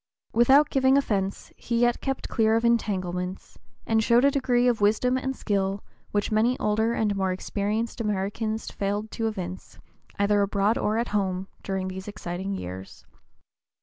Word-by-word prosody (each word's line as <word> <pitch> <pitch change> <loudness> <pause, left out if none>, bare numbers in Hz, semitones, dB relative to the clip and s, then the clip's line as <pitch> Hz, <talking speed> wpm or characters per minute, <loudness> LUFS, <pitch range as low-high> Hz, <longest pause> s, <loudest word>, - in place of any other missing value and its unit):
Without 270 +5 +5
giving 265 0 +4
offence 200 -8 -1
he 235 0 -2
yet 240 0 +2
kept 270 -1 -3
clear 220 -1 +2
of 230 +1 +1
entanglements, 185 -5 -1 0.3
and 220 -1 +2
showed 235 +3 +4
a 280 - +5
degree 250 -3 +2
of 235 -3 +1
wisdom 220 +5 +3
and 265 +1 -2
skill 195 -3 -1 0.3
which 205 +1 -1
many 230 +4 +2
older 220 +2 +1
and 210 -3 0
more 190 -1 0
experienced 210 +5 -2
Americans 210 +1 -2
failed 205 +2 -3
to 225 -1 -2
evince, 185 -4 -6 0.4
either 205 0 +3
abroad 200 +2 +2
or 215 +1 0
at 235 +1 -1
home, 190 -2 -1
during 190 -1 -3
these 190 +1 -6
exciting 185 -1 -5
years. 95 - -8
210 Hz, 155 wpm, -26 LUFS, 195-235 Hz, 0.4 s, Without